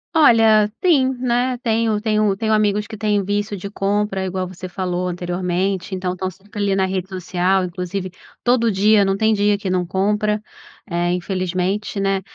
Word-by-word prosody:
Olha, 225 Hz, -8 st, +5 dB
sim, 275 Hz, -7 st, +4 dB
né. 250 Hz, 0 st, 0 dB
Tenho 225 Hz, -2 st, +1 dB
tenho 215 Hz, -2 st, +1 dB
tenho 220 Hz, +1 st, 0 dB
amigos 210 Hz, -1 st, +2 dB
que 220 Hz, +1 st, -8 dB
têm 210 Hz, -1 st, 0 dB
vício 205 Hz, +1 st, -2 dB
de 195 Hz, -, -6 dB
compra, 200 Hz, -1 st, -1 dB
igual 185 Hz, 0 st, -3 dB
você 185 Hz, 0 st, -8 dB
falou, 180 Hz, -1 st, -2 dB
anteriormente, 180 Hz, +2 st, -2 dB
então, 185 Hz, -1 st, -2 dB
estão 185 Hz, +1 st, -3 dB
sempre 205 Hz, +3 st, -9 dB
ali 200 Hz, -1 st, +1 dB
na 190 Hz, -1 st, +2 dB
rede 190 Hz, 0 st, -3 dB
social, 185 Hz, 0 st, 0 dB
inclusive, 180 Hz, +1 st, -4 dB, 0.3 s
todo 240 Hz, -2 st, +3 dB
dia, 205 Hz, +1 st, +4 dB
não 195 Hz, 0 st, +1 dB
tem 220 Hz, +1 st, +3 dB
dia 205 Hz, 0 st, +2 dB
que 200 Hz, -2 st, -3 dB
não 180 Hz, -1 st, +1 dB
compra, 210 Hz, +3 st, 0 dB, 0.5 s
eh, 175 Hz, -2 st, 0 dB
infelizmente, 185 Hz, +3 st, -2 dB
né. 195 Hz, -1 st, +1 dB
195 Hz, 170 wpm, -20 LUFS, 185-215 Hz, 0.5 s, Olha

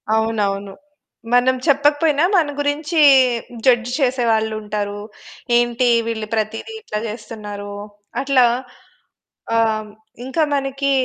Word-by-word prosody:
అవునవును. 205 Hz, -3 st, -1 dB, 0.6 s
మనం 250 Hz, +1 st, +4 dB
చెప్పకపోయినా 290 Hz, +2 st, +3 dB
మన 310 Hz, -4 st, +2 dB
గురించి 300 Hz, +3 st, -1 dB, 0.7 s
జడ్జ్ 240 Hz, -1 st, +3 dB
చేసే 255 Hz, -2 st, +1 dB
వాళ్ళుంటారు. 210 Hz, -2 st, -2 dB, 0.6 s
ఏంటి 240 Hz, +1 st, +1 dB, 0.2 s
వీళ్ళు 220 Hz, -2 st, -3 dB
ప్రతీది 220 Hz, -, -3 dB
ఇట్లా 210 Hz, -, -4 dB
చేస్తున్నారు. 210 Hz, -2 st, -7 dB, 0.5 s
అట్లా 270 Hz, -3 st, +4 dB, 1.1 s
ఆహ్, 230 Hz, 0 st, +3 dB
హ్మ్. 215 Hz, -1 st, -8 dB, 0.4 s
ఇంకా 265 Hz, +5 st, -1 dB
మనకి 275 Hz, 0 st, -1 dB
240 Hz, 100 wpm, -19 LUFS, 215-275 Hz, 1.1 s, మనం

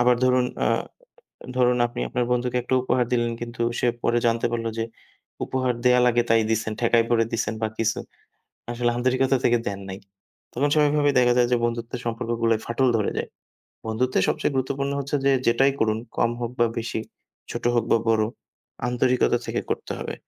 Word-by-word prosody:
আবার 125 Hz, 0 st, +4 dB
ধরুন, 125 Hz, 0 st, +3 dB, 0.2 s
আ -, -, +3 dB, 0.9 s
ধরুন 125 Hz, -1 st, +3 dB
আপনি 120 Hz, +1 st, -7 dB
আপনার 125 Hz, -, -1 dB
বন্ধুকে 125 Hz, 0 st, 0 dB
একটা 125 Hz, -, -1 dB
উপহার 125 Hz, -1 st, +1 dB
দিলেন। 120 Hz, -1 st, +1 dB
কিন্তু 120 Hz, 0 st, -4 dB, 0.2 s
সে -, -, +1 dB, 0.2 s
পরে 120 Hz, 0 st, +2 dB
জানতে 115 Hz, 0 st, +1 dB
পারল 115 Hz, -1 st, -2 dB
যে 115 Hz, -, 0 dB, 0.6 s
উপহার 130 Hz, -1 st, 0 dB
দেয়া 125 Hz, 0 st, +5 dB
লাগে 120 Hz, 0 st, +3 dB
তাই 115 Hz, 0 st, +5 dB
দিছেন, 110 Hz, -1 st, 0 dB
ঠেকায় 115 Hz, -1 st, +3 dB
পড়ে 115 Hz, -1 st, +3 dB
দিছেন 115 Hz, -1 st, -1 dB
বা 110 Hz, -, +1 dB
কিছু। 110 Hz, -1 st, 0 dB, 0.7 s
আসলে 120 Hz, 0 st, 0 dB
আন্তরিকতা 130 Hz, +2 st, +2 dB
থেকে 120 Hz, -, +4 dB
দেন 100 Hz, -1 st, -3 dB
নাই। 95 Hz, +1 st, -6 dB, 0.5 s
তখন 145 Hz, +4 st, +1 dB
স্বাভাবিকভাবেই 145 Hz, -2 st, +3 dB
দেখা 120 Hz, -1 st, +4 dB
যায় 120 Hz, -1 st, +4 dB
যে 125 Hz, -, +4 dB
বন্ধুত্বের 120 Hz, +1 st, -3 dB
সম্পর্কগুলায় 115 Hz, -1 st, 0 dB
ফাটল 130 Hz, +3 st, +1 dB
ধরে 105 Hz, -, 0 dB
যায়। -, -, -3 dB, 0.6 s
বন্ধুত্বের 125 Hz, +4 st, 0 dB
সবচেয়ে -, -, 0 dB
গুরুত্বপূর্ণ 140 Hz, +1 st, -1 dB
হচ্ছে 140 Hz, +1 st, -1 dB
যে, 140 Hz, -, +4 dB
যেটাই 135 Hz, +4 st, +4 dB
করুন 110 Hz, 0 st, +2 dB, 0.2 s
কম 115 Hz, -, +3 dB
হোক 120 Hz, -, -2 dB
বা 120 Hz, -, +5 dB
বেশি, 115 Hz, -1 st, -3 dB, 0.5 s
ছোট -, -, -5 dB
হোক 120 Hz, -2 st, +2 dB
বা -, -, +5 dB
বড় 110 Hz, -1 st, +3 dB, 0.6 s
আন্তরিকতা 125 Hz, 0 st, +2 dB
থেকে -, -, -1 dB
করতে -, -, -3 dB
হবে। -, -, -5 dB
120 Hz, 180 wpm, -24 LUFS, 115-125 Hz, 0.9 s, দেয়া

